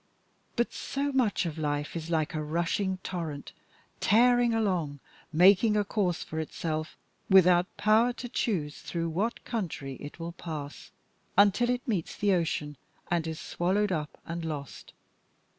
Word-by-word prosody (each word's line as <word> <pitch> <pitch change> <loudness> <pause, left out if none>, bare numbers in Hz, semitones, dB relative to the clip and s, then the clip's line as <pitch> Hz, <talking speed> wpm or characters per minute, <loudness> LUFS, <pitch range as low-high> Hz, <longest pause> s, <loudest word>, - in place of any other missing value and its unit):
But 240 -1 0
so 280 +1 -2
much 245 -9 +1
of 160 -2 -4
life 145 0 -2
is 165 0 -4
like 160 -3 0
a 155 - -2
rushing 170 +5 -1
torrent 160 -6 -5 0.5
tearing 245 +2 +4
along 180 -10 0 0.3
making 195 +6 +5
a 210 - +3
course 190 -4 0
for 160 - -5
itself, 155 0 -3 0.3
without 180 -1 +5
power 220 +3 +4
to 245 - -6
choose 195 - -2
through 165 -1 -3
what 200 +9 -2
country 155 - -4
it 145 +4 -9
will 165 +1 -4
pass, 155 -4 -7 0.5
until 205 +4 +5
it 250 +3 -1
meets 195 -9 -1
the 200 -1 +2
ocean 150 -4 -1 0.3
and 170 -2 +1
is 160 0 -4
swallowed 190 +5 0
up 155 -4 -3
and 170 0 -4
lost. 150 -4 -6
175 Hz, 145 wpm, -29 LUFS, 155-210 Hz, 0.5 s, making